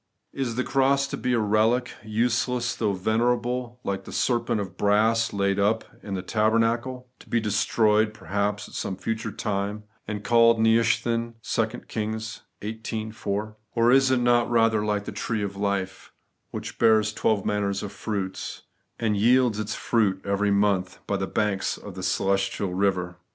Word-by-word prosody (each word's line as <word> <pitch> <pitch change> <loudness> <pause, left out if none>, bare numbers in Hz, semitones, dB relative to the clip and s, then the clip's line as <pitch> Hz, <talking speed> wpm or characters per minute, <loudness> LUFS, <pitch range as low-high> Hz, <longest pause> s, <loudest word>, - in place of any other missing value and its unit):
Is 130 -4 -2
the 130 - 0
cross 135 +1 +2
to - - -3
be 125 - -1
a 120 - +3
relic, 110 +4 +2
useless 120 +2 0
though 105 -3 0
venerable, 120 +4 0
like 95 -1 -3
the - - -9
serpent 120 -3 0
of 95 -4 -5
brass 110 +3 +2
laid 100 0 0
up 105 +3 +2 0.2
in 100 -2 -5
the 90 - -4
tabernacle; 115 +5 +1
to - - -17
be 120 - +2
destroyed 110 0 +2
perhaps 100 +1 -2
at - - -16
some 95 - -3
future 110 +2 -3
time, 100 +1 -3 0.2
and 105 -1 -4
eaUed 115 0 +5
Nehushtan? 115 +1 +2
(2 115 +1 -1
Kings 110 0 -4 0.2
xviii 110 0 -4
4.) 105 0 -4 0.2
Or 115 +1 +4
is 135 0 +5
it 130 - +3
not 120 -1 +3
rather 115 -2 +3
like 105 -1 -1
the - - -5
tree 110 -3 -2
of 100 -1 -4
life, 100 -2 -3 0.4
which - - -7
bears 110 -1 +4
twelve 105 -2 +1
manner 105 -1 0
of 100 0 -3
fruits, 95 -3 -4 0.3
and 110 -2 0
yields 120 +1 +3
its 110 0 -3
fruit 105 -5 +1
every 100 +1 +1
month, 100 -2 +1
by - - -1
the - - -2
banks 100 -2 -1
of 100 - -9
the 95 - -7
celestial 95 0 0
river 90 -2 0
110 Hz, 165 wpm, -25 LUFS, 100-115 Hz, 0.4 s, eaUed